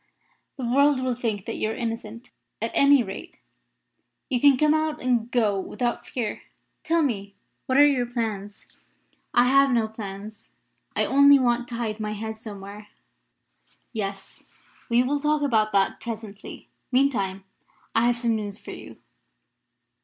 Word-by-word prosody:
"The 260 - -4
world 280 +3 +3
will 255 -1 0
think 225 -5 -3
that - - -4
you 215 - -1
are 220 - -3
innocent. 230 0 -5 0.3
At 225 +1 -2
any 280 -2 +5
rate, 195 -2 -8 0.9
you 245 -2 +1
can 280 -2 +6
come 300 +2 +4
out 310 -1 0
and 245 -2 0
go 220 -5 +2
about - - -6
without 240 +2 -3
fear. 230 -5 -3 0.4
Tell 330 0 +2
me, 200 -7 -3 0.3
what 260 - +2
are 290 - +8
your 260 -4 +2
plans?" 215 -4 -4 0.7
"I 245 - +4
have 275 +2 +5
no 230 -3 +2
plans. 210 -1 -9 0.5
I - - +2
only 280 +1 +6
want 240 -2 +1
to 240 - -6
hide 225 -2 -3
my 210 0 -3
head 220 +1 -5
somewhere." 205 -1 -10 1.1
"Yes; 195 -3 -5 0.5
we 240 +1 +4
will 285 +3 0
talk 300 0 +1
about 220 -6 +2
that 195 -1 +2
presently. 220 -3 -8 0.2
Meantime, 230 -8 +1 0.5
I 230 +1 +3
have 240 0 +2
some 235 -1 0
news 205 -2 -4
for - - -10
you." - - -10
235 Hz, 155 wpm, -25 LUFS, 210-260 Hz, 1.1 s, are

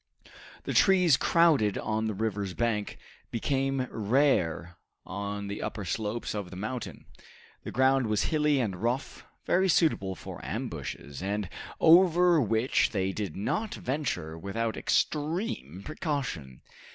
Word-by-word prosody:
The - - -3
trees, 180 -6 +5
crowded 150 - +3
on 110 +1 -1
the 110 - -2
river's 100 -3 -2
bank, 115 -3 -1 0.3
became 135 +2 0
rare 100 - +1 0.3
on 100 +1 -4
the 100 +1 -5
upper 105 - -4
slopes 110 +5 -3
of 100 -4 -4
the 95 - -9
mountain. 110 +6 -5 0.6
The - - -6
ground 130 -1 +3
was 105 -1 +1
hilly 150 -2 +2
and 105 -7 -1
rough, 120 +7 -2 0.2
very 190 +1 +2
suitable 100 - +2
for - - -9
ambushes, 70 +1 -5
and 100 +1 -2 0.3
over 175 0 +6
which 115 +2 +2
they 95 -2 -1
did 100 -5 -4
not 210 - -2
venture 125 - -3
without 110 +5 -2
extreme 150 - -1
precaution. 130 - -4
110 Hz, 130 wpm, -28 LUFS, 100-145 Hz, 0.6 s, over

